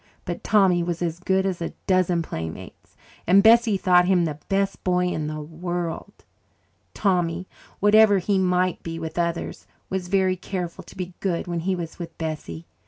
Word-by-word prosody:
But - - -5
Tommy 190 -5 +4
was 170 0 -2
as 170 0 -2
good 190 +1 +1
as 185 -3 -2
a 170 - -3
dozen 185 -2 +2
playmates, 80 - -8 0.3
and 195 +3 +6
Bessie 225 -2 +6
thought 180 -1 +4
him 180 -2 +3
the 150 -2 -4
best 195 0 0
boy 180 -1 +2
in 155 -4 -2
the 155 0 -4
world. 170 +2 -5 0.7
Tommy, 180 -2 0 0.3
whatever 205 0 +6
he 195 +1 +1
might 180 -1 +1
be 165 0 -5
with 165 +1 -5
others, 170 0 -3 0.2
was 190 -1 -2
very 190 0 +2
careful 180 -2 -5
to - - -14
be 180 -1 -5
good 180 -4 -1
when 175 -1 -3
he 185 +3 -1
was 170 -1 -6
with 165 -2 -8
Bessie. 150 - -5
180 Hz, 170 wpm, -24 LUFS, 170-190 Hz, 0.7 s, and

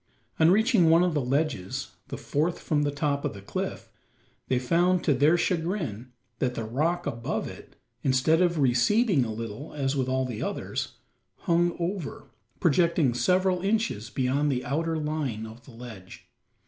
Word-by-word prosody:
On 160 0 +6
reaching 210 -3 +4
one 165 +2 +6
of 180 -2 +1
the 150 - +1
ledges 135 - -1 0.2
the - - -6
fourth 160 +4 -1
from 150 -3 0
the 145 - +1
top 145 0 -1
of - - -2
the 100 - -9
cliff - - -4 0.6
they 130 - +1
found, 175 +8 +2
to 145 - +3
their 145 +6 +4
chagrin, 160 - -2 0.3
that 125 -1 0
the 115 - -3
rock 155 +10 -1
above 115 -5 -3
it, - - -11 0.3
instead 135 +6 +3
of 175 -2 +2
receding 145 - +3
a 115 - -3
little, 115 +5 -6
as 140 -1 -1
with 130 -2 0
all 130 0 +1
the 120 -4 -5
others, - - -3 0.5
hung 175 0 +2
over 175 -1 -4 0.3
projecting 170 -4 +3
several 185 +6 +2
inches 195 - 0
beyond 140 +3 +1
the 125 -1 -2
outer 160 +5 -1
line 150 -8 -2
of 115 +2 -12
the - - -13
ledge. 115 -6 -11
145 Hz, 165 wpm, -27 LUFS, 125-170 Hz, 0.6 s, On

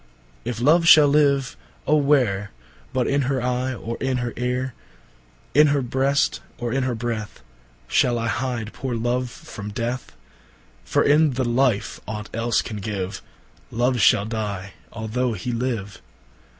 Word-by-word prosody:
O - - -13
if 120 -2 -4
Love 165 +7 +4
shall 150 -3 +9
live, 140 -3 +2 0.3
ô 150 0 +4
where, 120 -9 +2 0.4
But 130 -2 0
in 140 0 +1
her 135 -2 +1
Eye, 125 +1 -1
or 115 0 -5
in 130 -1 -1
her 120 -1 -3
Eare, 125 +1 -2 0.8
In 150 +2 +6
her 140 -2 +1
Brest, 135 +3 +1 0.2
or 120 -1 -3
in 135 - +1
her 125 -2 -1
Breath, 110 - -4 0.4
Shall 120 -1 +2
I 115 - -2
hide 120 -2 -2
poore 125 -1 -4
Love 120 +2 -1
from 105 -2 -9
Death? 120 +4 -4 0.7
For - - +1
in 150 0 +4
the 130 +1 -1
life 120 -3 +1
ought 105 -1 -6
else 115 +1 +1
can 110 - -6
give, 100 -2 -4 0.5
Love 120 +2 +1
shall 100 0 +5
dye, 105 -3 -4 0.2
although 115 +3 -2
he 110 +5 -4
live. 115 -5 -3
120 Hz, 155 wpm, -23 LUFS, 110-130 Hz, 0.8 s, shall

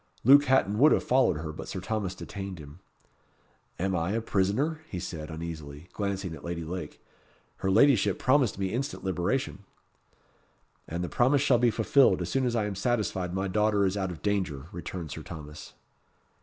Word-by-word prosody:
Luke 140 +4 +7
Hatton 110 -6 +2
would 150 +4 +7
have - - +1
followed 125 - +3
her, 80 0 -5
but - - -8
Sir 95 - -4
Thomas 95 0 -3
detained 95 -2 -7
him. 75 -2 -12 1.0
"Am 95 +1 -1
I 85 +3 -1
a 115 - +1
prisoner?" 115 +11 0
he 90 - -4
said, 80 -3 -6
uneasily, 80 -3 -7
and 90 - -21
glancing 100 -4 -3
at 75 - -10
Lady 85 -1 -4
Lake. 90 +3 -6 0.6
"Her 95 - -1
ladyship 105 -2 +4
promised 130 -4 +2
me 95 0 -2
instant 135 +4 -3
liberation." 95 +7 -1 1.3
"And 85 +2 -3
the - - -2
promise 135 +7 +2
shall 130 -5 +4
be 120 0 +4
fulfilled 115 +4 +4
as - - -4
soon 130 -1 +1
as 120 - -1
I 110 -3 +1
am 105 - -3
satisfied 100 -4 -1
my 95 +1 -1
daughter 105 +1 +2
is 95 +1 0
out 95 -2 -1
of 85 -3 -9
danger," 95 -9 -1
returned 85 -2 -6
Sir - - -6
Thomas. 75 -2 -10
95 Hz, 185 wpm, -28 LUFS, 85-120 Hz, 1.3 s, Luke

